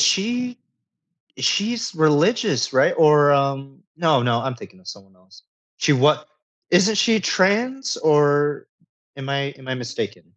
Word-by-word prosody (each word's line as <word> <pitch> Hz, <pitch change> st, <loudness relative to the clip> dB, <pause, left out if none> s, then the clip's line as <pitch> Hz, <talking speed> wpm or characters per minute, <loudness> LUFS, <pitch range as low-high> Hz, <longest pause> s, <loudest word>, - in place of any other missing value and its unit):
she 245 Hz, +5 st, 0 dB, 0.8 s
is -, -, -4 dB
she's 230 Hz, +2 st, -1 dB
religious, 160 Hz, -, +1 dB
right? 130 Hz, -, +3 dB
Or, 150 Hz, -2 st, +5 dB
um, 140 Hz, +3 st, -2 dB
no 160 Hz, -7 st, +1 dB
no, 120 Hz, -1 st, 0 dB
I'm 135 Hz, -2 st, -4 dB
thinking 185 Hz, +9 st, -15 dB
of 185 Hz, -, -21 dB
someone 95 Hz, -2 st, -12 dB
else. 95 Hz, +2 st, -22 dB, 0.3 s
She 150 Hz, -, +2 dB
what 150 Hz, +3 st, +2 dB, 0.4 s
isn't 200 Hz, +5 st, +3 dB
she 220 Hz, +1 st, +2 dB
trans 240 Hz, +8 st, 0 dB
or 145 Hz, -1 st, +1 dB, 0.5 s
am 135 Hz, 0 st, -8 dB
I 140 Hz, 0 st, -3 dB
am 130 Hz, -1 st, -16 dB
I 130 Hz, -, -3 dB
mistaken? 125 Hz, 0 st, -6 dB
150 Hz, 145 wpm, -20 LUFS, 135-200 Hz, 0.8 s, Or